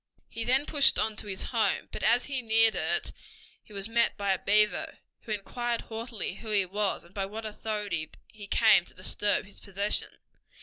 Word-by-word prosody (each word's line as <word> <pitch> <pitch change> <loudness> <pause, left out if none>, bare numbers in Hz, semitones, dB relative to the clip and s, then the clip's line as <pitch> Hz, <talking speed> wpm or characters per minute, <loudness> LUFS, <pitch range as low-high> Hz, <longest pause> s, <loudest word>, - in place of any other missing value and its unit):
He 230 - -5
then 260 +4 +2
pushed 285 -3 +4
on 220 0 0
to - - -5
his 190 -2 -4
home, - - 0
but - - -6
as 240 +1 +3
he 275 -3 -3
neared 225 -1 +5
it - - 0 0.5
he - - -22
was 200 0 -1
met 235 +1 +1
by 200 -1 +1
a 185 - -2
beaver, 210 +1 +2 0.3
who 225 - -6
inquired 235 +3 -2
haughtily 225 -4 -5
who 225 - -9
he 205 -3 +3
was, 200 +2 -1
and 170 - -20
by 195 -1 -2
what 220 +2 -7
authority 210 -6 -3 0.2
he 205 -2 -12
came 215 -3 +5
to - - -17
disturb 205 +2 0
his 200 - -14
possession. 200 +1 -1
210 Hz, 190 wpm, -28 LUFS, 200-230 Hz, 0.5 s, neared